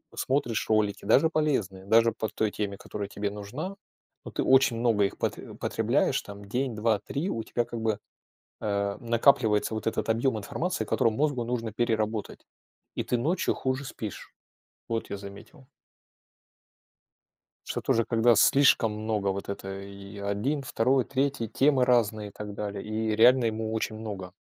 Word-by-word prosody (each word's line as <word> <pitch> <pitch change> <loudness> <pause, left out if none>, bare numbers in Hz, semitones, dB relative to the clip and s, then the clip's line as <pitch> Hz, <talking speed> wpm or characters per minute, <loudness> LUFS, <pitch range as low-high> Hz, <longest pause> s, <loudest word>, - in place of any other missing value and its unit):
смотришь 130 -4 0
ролики, 105 -2 +1
даже 160 +4 +5
полезные, 115 - -1
даже 115 +3 +5
по 110 - -3
той 105 0 -1
теме, 100 -2 -3
которая 100 0 -6
тебе 100 0 -3
нужна. 115 - -6 0.5
Но - - -6
ты - - -1
очень 130 -3 +4
много 115 -4 +3
их 100 - -4
потре - - -4
потребляешь. - - +1
Там 100 0 -10
день, 125 +3 -2
2, 110 -1 +1
3 145 - -3
у 115 - -3
тебя 120 +1 -1
как 115 - -6
бы 110 -2 0 0.6
э 100 -1 -1
накапливается 115 -2 +3
вот 110 - -5
этот 115 - -1
объем 115 +1 +1
информации, 180 - -2
который 115 - +2
мозгу 140 -1 0
нужно 115 -2 -3
переработать. 110 -1 -1 0.5
И - - -2
ты 125 - 0
ночью 165 +9 +1
хуже 130 +1 -2
спишь. 110 -5 -7 0.6
Вот 115 -1 -3
я - - -3
заметил. 100 +8 -12 2.0
Что - - -3
тоже 115 0 +2
когда 115 +1 +4
слишком 130 -3 +5
много 105 -1 -2
вот 100 0 -2
этой 100 0 -6
и 100 +1 -11
один, 105 +9 -1
второй, 125 +1 +2
третий, 135 -2 -1
темы 135 +2 +3
разные 110 -4 +2
и - - -17
так 105 +1 -7
далее, 100 -1 -4
и 110 0 -1
реально 120 +3 +6
ему 110 0 -1
очень 110 -1 -2
много. 100 -5 -6
110 Hz, 160 wpm, -28 LUFS, 105-125 Hz, 2.0 s, реально